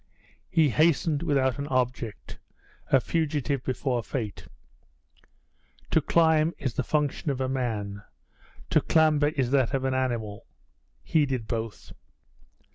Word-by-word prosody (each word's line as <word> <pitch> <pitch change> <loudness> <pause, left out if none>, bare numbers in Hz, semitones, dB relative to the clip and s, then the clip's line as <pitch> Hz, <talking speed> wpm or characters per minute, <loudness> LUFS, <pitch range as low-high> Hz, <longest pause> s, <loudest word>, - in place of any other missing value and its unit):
He 160 -4 +3
hastened 155 0 +2
without 135 -4 +1
an 140 - -3
object 125 -4 -2 0.5
a 135 - +4
fugitive 145 -3 -1
before 130 -1 -1
Fate. 110 -2 -5 1.4
To - - +4
climb 160 -1 +3
is 130 -4 -3
the - - -1
function 150 0 -1
of 135 -2 -2
a 130 - 0
man; 110 -6 -3 0.7
to - - +4
clamber 155 -2 +3
is 135 -5 -1
that 135 -1 +2
of 135 0 -1
an 130 - +1
animal 120 -6 -2 0.6
he 150 -3 +2
did 130 -4 -2
both. 115 -2 -5
135 Hz, 125 wpm, -27 LUFS, 120-150 Hz, 1.4 s, a